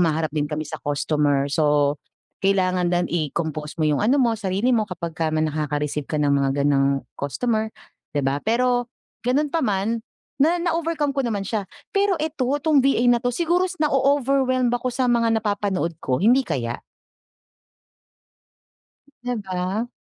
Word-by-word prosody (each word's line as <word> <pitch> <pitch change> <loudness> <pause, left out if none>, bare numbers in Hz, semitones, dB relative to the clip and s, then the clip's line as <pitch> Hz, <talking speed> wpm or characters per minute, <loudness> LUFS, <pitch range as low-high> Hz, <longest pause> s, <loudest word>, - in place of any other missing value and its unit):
humaharap 160 -2 +1
din 150 -1 -1
kami 155 0 -3
sa - - -7
customer. 145 -1 +1
So, 145 -1 +2 0.4
kailangan 185 -2 +2
lang 175 0 +1
i-compose 155 -2 -3
mo 160 - 0
yung 150 -2 +2
ano 240 +7 +3
mo, 245 -4 +3
sarili 215 +3 0
mo 215 -3 +1
kapagka 170 -3 -3
may 155 0 0
nakaka-receive 150 -1 -2
ka 155 - -2
ng 145 -1 +2
mga 140 -1 +2
ganung 140 -1 +2 0.2
customer, 220 - -1 0.5
'di 145 - +1
ba? 135 +2 0
Pero 245 +3 +1 0.3
ganun 280 +4 0
pa 330 - +1
man, 215 -1 0 0.4
na 325 +5 +4
na-overcome 330 -4 -1
ko 275 - -1
naman 220 -6 -1
siya. 200 -1 -3 0.2
Pero 395 -2 +2
ito, 300 -5 -2
'tong 290 +1 +3
VA 265 -2 +2
na 240 - +2
'to 245 - 0
siguro 345 +8 +1
s 365 - -8
na-o-overwhelmed 270 -4 +2
ako 245 +1 -1
sa 255 +1 -1
mga 230 -2 +2
napapanood 205 -5 -1
ko, 130 - 0
hindi 235 - +4
kaya? 120 - -3 2.4
'Di 245 0 -1
ba? 190 +4 -2
205 Hz, 155 wpm, -23 LUFS, 155-255 Hz, 2.4 s, na